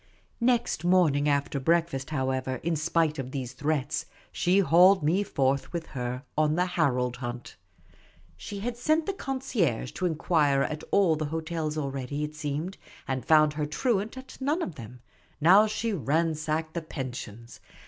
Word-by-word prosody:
Next 240 -8 +1
morning 160 -5 +3
after 140 0 0
breakfast, 160 -2 +1
however, 130 -2 -1
in 170 +1 0
spi' 165 +1 +2
.e - - -8
of 130 -1 -4
these 130 -2 -5
threats, 145 0 -1 0.2
she 180 +2 +2
hauled 185 -1 +6
me 170 +7 +2
forth 135 -8 0
with 170 -2 -4
her 125 0 -4
on 155 0 +2
the 180 +1 +2
Harold 125 -9 0
hunt. 120 -1 -6 0.8
She 200 - -7
had 240 +2 -3
sent 310 +6 +1
the 395 - -1
concierge 250 - -1
to 185 - -1
inquire 150 -4 +2
at 155 0 -4
all 185 -5 +4
the 155 0 -2
hotels 160 0 -3
already, 140 0 -3
it 150 0 -4
seemed, 155 +5 -4 0.3
and 130 -2 -2
found 155 +2 +5
her 150 -1 -2
truant 215 - -1
at 260 +1 -11
none 300 +6 0
of 180 - -4
them; 120 -1 -11 0.4
now 190 +7 +6
she 215 +1 -2
ransacked 155 - -1
the 170 - -2
pensions. 120 -6 -7
155 Hz, 160 wpm, -27 LUFS, 135-180 Hz, 0.8 s, hauled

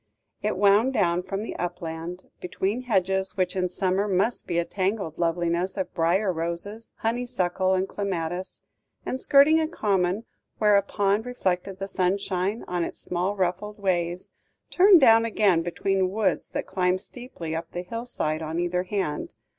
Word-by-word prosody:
It 210 -2 -1
wound 205 +6 +4
down 175 -6 +2
from 195 +3 -4
the - - -6
upland, 175 0 -5 0.2
between 195 +6 -2
hedges 190 -3 0
which 185 -1 0
in 180 -1 0
summer 190 +2 0
must 200 +5 0
be 170 - -1
a 170 - +1
tangled 190 -4 -2
loveliness 170 +2 0
of 190 - -3
briar 180 +4 +2
roses, 170 +7 -5
honeysuckle, 210 -6 0
and 185 +1 0
clematis; 185 -2 -4 0.4
and, 260 - -3
skirting 290 +3 +6
a 315 - +1
common 200 - 0 0.3
where 210 -1 +4
a 200 - +5
pond 200 +3 0
reflected 190 -5 -2
the 195 0 -4
sunshine 190 +2 -1
on 175 -1 -1
its - - -6
small 180 +3 -2
ruffled 195 +3 -2
waves, 180 -3 -1 0.4
turned 375 -1 +7
down 225 -3 +7
again 205 -6 +2
between 185 +2 0
woods 210 +1 0
that - - -3
climbed 185 0 0
steeply 195 -12 -7
up 165 0 -5
the 175 - -4
hill 230 +6 -6
side 155 -9 -2
on 160 +1 -4
either 175 +1 0
hand. 180 - -3
190 Hz, 160 wpm, -26 LUFS, 175-210 Hz, 0.4 s, turned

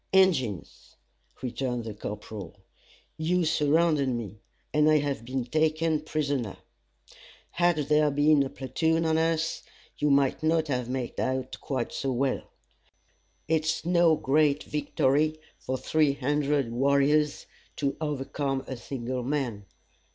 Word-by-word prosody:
"Injins," 155 - +1 0.5
returned 125 -1 -2
the 110 -1 -6
corporal, 105 -2 -7 0.6
"you 175 +2 +1
surrounded 155 -2 +2
me, 110 -4 -4 0.3
and 150 0 +4
I 155 - +5
have 140 -5 -2
been 130 +1 -3
taken 155 +3 +1
prisoner 145 -8 -2 0.9
had 175 0 +2
there 150 0 +4
been 145 +1 +4
a 135 - 0
platoon 160 +6 0
on 160 0 +2
us, 165 0 0 0.4
you 150 -1 +2
mightn't 155 +3 +2
have 125 -3 -1
made 130 -1 -3
out 130 0 -2
quite 130 -4 -2
so 135 - -2
well. 130 +1 -1 1.0
It's 160 0 0
no 170 -2 +4
great 145 0 +2
victory 150 +1 0 0.2
for 130 - -3
three 150 +1 +2
hundred 140 -2 0
warriors 140 +4 +2 0.3
to 140 -1 -1
overcome 140 -2 -2
a 130 - -6
single 125 0 -4
man. 120 -7 -3
140 Hz, 120 wpm, -27 LUFS, 130-155 Hz, 1.0 s, I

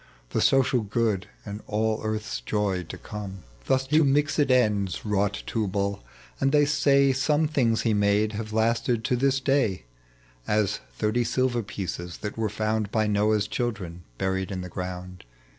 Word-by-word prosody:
The - - 0
social 130 -2 +3
good, 105 -2 0 0.2
and 105 0 -6
all 110 +1 0
earth's 105 - -3
joy 100 - 0
to - - -8
come. 100 -3 -7 0.2
Thus 130 0 +2
to 155 +4 +4
mixed 145 +2 +2
ends 110 -10 +2
wrought 100 -1 0
Tubal; 100 - -1 0.4
and 135 0 +2
they 145 0 +5
say, 140 -1 +4
Some 150 +4 +2
things 120 -7 +1
he 115 - +2
made 105 +1 +2
have 110 0 -5
lasted 115 +1 +1
to 125 - +1
this 135 +2 +2
day; 130 - +1 0.6
As, 105 -2 +1 0.2
thirty 110 - +1
silver 120 +1 +1
pieces 90 -4 -5
that 105 -1 -4
were 110 -1 -1
found 110 0 -1
By 110 -1 +2
Noah's 105 0 +2
children 105 -8 -3 0.2
buried 95 0 -1
in 95 -1 -3
the 90 - -7
ground. 90 0 -6
110 Hz, 160 wpm, -26 LUFS, 100-125 Hz, 0.6 s, they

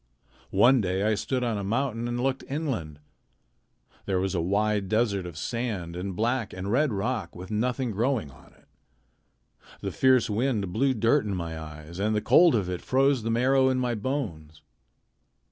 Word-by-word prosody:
One 120 +5 +6
day 95 0 -1
I 110 +1 +2
stood 125 +4 -1
on 115 -4 -1
a - - -4
mountain 115 +2 -1
and 120 0 -2
looked 130 +1 -1
inland. 130 - -3 1.1
There 95 -2 +1
was 95 +1 -1
a 90 - 0
wide 100 +2 0
desert 105 -4 +1
of 85 -3 -9
sand 105 -6 -3
and 90 +1 -4
black 115 +1 -1
and 95 +2 -4
red 140 +3 +2
rock 105 -2 -2
with 90 +4 -9
nothing 125 +3 -1
growing 110 - -1
on 65 - -18
it. - - -26 1.2
The - - -3
fierce 130 -2 +3
wind 105 -4 -1
blew 130 +3 +2
dirt 115 +5 +2
into 100 -2 -2
my 85 -2 -4
eyes, 80 +2 -9
and 105 +2 +1
the - - +2
cold 170 +3 +5
of 100 -5 0
it 90 -1 -4
froze 135 0 +2
the 115 - -3
marrow 130 +3 +3
in 130 - +1
my 125 -1 0
bones. 95 - -4
110 Hz, 180 wpm, -27 LUFS, 95-130 Hz, 1.2 s, One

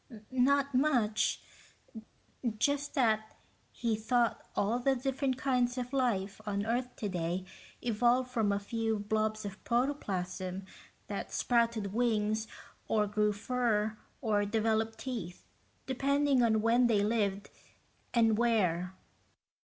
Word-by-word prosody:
"Not 275 +2 +2
much. 250 -6 +2 1.1
Just 285 +5 0
that 220 -5 +1 0.4
he 230 -2 -1
thought 235 +2 +1
all 225 +5 +1
the 270 +2 +2
different 265 0 -1
kinds 250 -2 +1
of 250 +1 -4
life 215 -7 0
on 205 -1 -2
earth 245 +2 -1
today 180 -3 -2 0.4
evolved 245 +2 +2
from 225 -5 +1
a 200 - +1
few 225 +2 -1
blobs 215 +1 -1
of 200 0 -7
protoplasm 190 -7 -2 0.4
that - - -5
sprouted 230 -4 +1
wings 220 -2 +1 0.4
or 210 -1 +2
grew 210 +1 +1
fur 220 -1 0 0.3
or 210 -4 +2
developed 220 +1 0
teeth, 225 -10 -6 0.4
depending 275 +1 +2
on 220 -2 +3
when 240 +2 +4
they 210 -3 +3
lived, 205 -2 0 0.6
and 225 -2 +3
where." 190 -6 +1
225 Hz, 115 wpm, -32 LUFS, 210-250 Hz, 1.1 s, when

